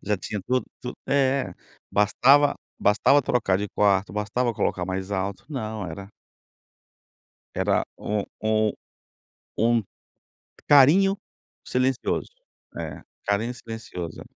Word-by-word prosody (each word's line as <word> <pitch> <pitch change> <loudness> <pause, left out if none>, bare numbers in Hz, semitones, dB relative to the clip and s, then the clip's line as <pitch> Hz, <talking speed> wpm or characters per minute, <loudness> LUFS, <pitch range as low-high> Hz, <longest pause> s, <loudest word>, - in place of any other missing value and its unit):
já 105 0 0
tinha 100 +3 -5
tudo 130 0 +1 0.2
tu 125 - -5 0.2
é, 135 -1 +1 0.4
bastava 135 +8 +4 0.2
bastava 115 +7 +4
trocar 115 -7 +1
de 105 0 -3
quarto, 100 -2 +2
bastava 105 +4 -1
colocar 90 -3 -1
mais 95 +1 -4
alto, 100 +3 -3
não, 110 - -4
era 100 +4 -8 1.5
era - - +1
um 105 -1 -2 0.2
um 110 -1 +2 0.9
um 115 0 +3 0.9
carinho 170 +8 +6 0.5
silencioso, 130 0 0 0.5
é, - - -6 0.2
carinho 110 +5 0
silencioso. 110 -8 -7
110 Hz, 105 wpm, -25 LUFS, 100-130 Hz, 1.5 s, carinho